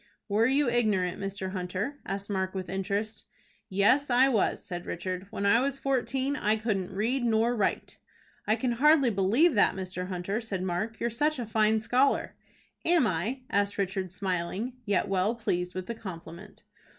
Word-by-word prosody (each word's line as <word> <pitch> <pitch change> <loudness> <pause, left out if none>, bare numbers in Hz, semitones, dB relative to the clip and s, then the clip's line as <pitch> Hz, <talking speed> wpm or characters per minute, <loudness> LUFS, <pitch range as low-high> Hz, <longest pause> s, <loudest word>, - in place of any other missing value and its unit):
"Were 220 +2 +3
you 275 +1 +2
ignorant, 210 -7 +1
Mr. 195 -1 -4
Hunter?" 190 +9 -3
asked 195 0 -3
Mark, 190 -2 -2
with 185 -2 -4
interest. 205 +3 -2 0.4
"Yes, 205 +9 +3
I 255 +2 +5
was," 225 -7 0
said 175 -2 -6
Richard. 185 +2 -4
"When 200 - -3
I 200 +3 +5
was 275 +1 0
fourteen, 270 +1 0
I 215 -6 +1
couldn't 210 -5 -2
read 230 +7 0
nor 230 +1 +2
write." 210 -4 -1 0.5
"I 215 - +4
can 240 +2 -1
hardly 275 +1 +4
believe 220 - +3
that, 205 - +3
Mr. 185 -1 -4
Hunter," 190 +4 -3
said 195 -5 -3
Mark. 190 +5 -2
"You're 235 - -1
such 300 +6 +1
a 245 - -3
fine 220 0 +2
scholar." 245 +5 +1 0.5
"Am 335 -5 +4
I?" 215 +8 -1
asked 200 0 +1
Richard, 190 -2 -2
smiling, 185 +5 -2
yet 200 -3 +1
well 195 +4 +1
pleased 180 -5 -2
with 185 -1 -4
the 235 - -4
compliment. 185 -2 -9
210 Hz, 170 wpm, -28 LUFS, 190-240 Hz, 0.5 s, I